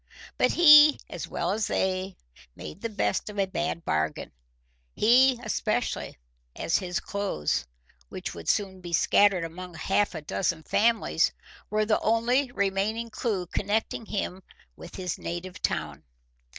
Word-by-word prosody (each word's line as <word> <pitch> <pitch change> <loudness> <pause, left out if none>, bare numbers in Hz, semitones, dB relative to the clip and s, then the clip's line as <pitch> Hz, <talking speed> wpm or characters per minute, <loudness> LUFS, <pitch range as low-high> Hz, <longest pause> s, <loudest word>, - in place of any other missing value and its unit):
But - - +2
he, 300 -3 +8
as - - -5
well 175 - -2
as 210 +1 -1
they, 185 0 -1 0.4
made 180 - -9
the 230 - -3
best 215 0 -1
of 210 - -9
a 195 - +2
bad 170 -2 -3
bargain, 80 0 -1 0.6
he 250 +3 +5
especially, - - -2 0.4
as 165 - 0
his 180 -2 -3
clothes, 75 - -2 0.4
which - - -6
would 85 -1 -9
be - - +6
soon 190 -4 -4
scattered 195 +1 +4
among 175 +2 -8
half 195 +4 0
a 160 - -5
dozen 165 +1 -2
families, 220 -6 +2 0.4
were 215 +1 +1
the 215 0 +2
only 245 +4 +1
remaining 210 +3 -1
clew 210 -6 -2
connecting 210 +4 -2
him 190 -2 -3 0.3
with - - -11
his 180 -2 -4
native 175 +2 -6
town. - - -2
195 Hz, 140 wpm, -27 LUFS, 175-220 Hz, 0.6 s, he